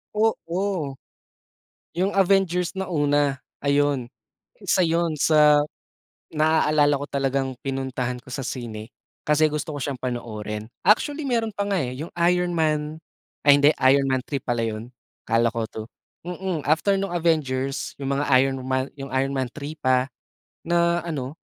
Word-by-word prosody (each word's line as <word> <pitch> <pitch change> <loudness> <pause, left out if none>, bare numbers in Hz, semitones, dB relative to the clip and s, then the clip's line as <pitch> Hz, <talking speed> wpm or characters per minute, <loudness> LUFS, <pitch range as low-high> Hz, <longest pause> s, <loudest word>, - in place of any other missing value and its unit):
Oo, 190 -8 -1 1.0
'yung 185 +3 +1
Avengers 190 -3 +2
na 190 -1 -4
una 145 -3 +2 0.2
ayun, 140 -3 +1 0.5
isa 190 -2 +1
'yun 165 -1 +1
sa 150 -1 +5 0.7
naaalala 155 -1 +3
ko 145 - -5
talagang 135 -2 -1
pinuntahan 130 -2 -3
ko 130 - -15
sa 130 0 -4
sine 115 -3 -6 0.4
kasi 150 0 +3
gusto 150 0 -3
ko - - -4
siyang 140 -2 -3
panoorin. 110 -3 -5 0.2
Actually 285 +8 +3
meron 230 -4 0
pa 200 +1 -2
nga 200 -2 0
eh, 125 0 -5
'yung 160 +4 -6 0.2
Iron 180 0 0
Man 155 -1 -1 0.4
ay 145 - +6
hindi, 145 +1 +6
Iron 135 +1 +5
Man 130 -1 0
3 140 +2 -3
pala 120 -1 0
'yun, 115 +2 -4 0.3
akala 115 +1 +3
ko 115 -2 -3
2, 110 0 -8 0.4
mm, 180 -3 -3
after 165 +6 +3
nung 195 -1 -2
Avengers 140 -7 -1
'yung 140 0 -1
mga 140 +1 0
Iron 135 0 +1
Man, 130 0 -1
Iron 135 0 -2
Man 130 -2 -1
3 145 +3 -7
pa, 130 0 +3 0.6
na 170 0 +2
ano. 145 -4 -4
145 Hz, 150 wpm, -24 LUFS, 130-170 Hz, 1.0 s, ay